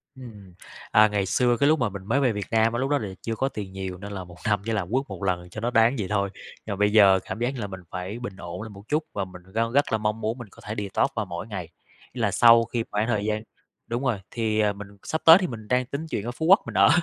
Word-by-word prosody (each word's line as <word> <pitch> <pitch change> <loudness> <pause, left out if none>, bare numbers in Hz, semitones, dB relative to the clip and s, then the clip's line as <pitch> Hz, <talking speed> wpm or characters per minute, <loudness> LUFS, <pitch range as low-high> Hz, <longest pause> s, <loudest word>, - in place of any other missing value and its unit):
Ừm. 105 -8 -12 0.4
À, 110 0 +7
ngày 105 -2 0
xưa 120 +5 +2
cái 140 - +3
lúc 155 0 +3
mà 120 -4 +1
mình 95 -1 -8
mới 115 +7 +1
về 130 -4 +3
Việt 105 -2 -4
Nam 115 0 +3
á 120 - -1
lúc 135 +2 -1
đó 145 - +3
là 110 -7 -4
chưa 115 -1 -3
có 135 +4 0
tiền 105 -7 -6
nhiều, 95 -1 -5
nên 100 +2 -8
là 95 -2 -5
1 90 -1 -14
năm 105 -2 +2
chỉ 115 - -2
là 100 -5 0
quất 130 +3 +1
1 95 -2 -8
lần 90 -2 -1
cho 110 - -7
nó 120 +2 -1
đáng 115 +3 +4
vậy 100 - -2
thôi. 100 -1 +1 0.4
Nhưng 110 - -3
mà - - -3
bây 105 +1 +2
giờ 100 -3 +6
cảm - - -5
giác 120 +1 +1
như 130 - -6
là 105 - -3
mình 95 -1 -8
phải 95 +5 -5
bình 120 -6 -6
ổn 85 0 -7
lại 110 - -7
một 100 -1 -12
chút, 155 +1 +1
và 100 - -2
mình 90 -1 -12
gan 115 +1 0
rất 140 0 +2
là 110 - +3
mong 105 +1 -2
muốn 110 +3 -2
mình 120 -3 -8
có - - -16
thể 105 - -4
detox 100 -2 0
vào - - -1
mỗi 85 +4 -6
ngày. 95 -6 -6 0.4
Là 110 -5 0
sau 115 +2 +7
khi 115 0 -2
khoảng 105 +2 0
thời 105 -4 0
gian 110 0 -1 0.4
đúng 120 +3 -2
rồi, 120 -7 0
thì, 110 -2 0
ờ, 105 -1 +3
mình 100 0 -9 0.2
sắp 160 - -2
tới 165 +1 +11
thì 185 - -1
mình 110 -6 -8
đang 125 +1 +2
tính 140 +5 -5
chuyển 105 - -3
ra 120 - -2
Phú 160 +6 -4
Quốc 195 +6 +7
mình - - -6
ở, - - +7
110 Hz, 305 wpm, -25 LUFS, 100-120 Hz, 0.4 s, tới